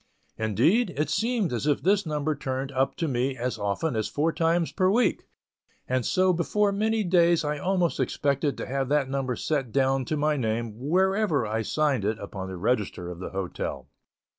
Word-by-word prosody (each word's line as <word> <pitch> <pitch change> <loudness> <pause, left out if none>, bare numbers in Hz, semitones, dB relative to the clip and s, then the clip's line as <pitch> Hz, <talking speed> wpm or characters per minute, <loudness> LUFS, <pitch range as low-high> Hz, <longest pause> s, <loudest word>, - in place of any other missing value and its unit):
Indeed, 125 - +2
it 150 - 0
seemed 225 - 0
as 120 +4 -2
if 145 -2 +1
this 200 0 +2
number 150 0 -1
turned 135 -1 -4
up 135 0 0
to 165 - -2
me 130 0 -1
as 125 +1 -3
often 105 +8 -1
as 110 -1 0
four 160 +3 0
times 165 0 +1
per 185 0 +2
week, 235 +5 +2 0.6
and 130 0 0
so 185 +8 +2
before 200 +4 +1
many 220 +2 +1
days 170 -3 +3
I 150 0 -2
almost 180 0 0
expected 140 0 0
to - - -4
have 135 0 -2
that 145 -2 +1
number 135 -2 -1
set 135 -5 -2
down 135 0 +1
to 155 - -2
my 150 0 +1
name 115 -2 -1 0.2
wherever 190 - +2
I 110 +1 -1
signed 140 -1 0
it 105 +2 0
upon 100 -2 -6
the 95 -1 -6
register 100 -4 -1
of 85 - -9
the 95 - -5
hotel. 95 -2 -4
140 Hz, 190 wpm, -26 LUFS, 120-170 Hz, 0.6 s, days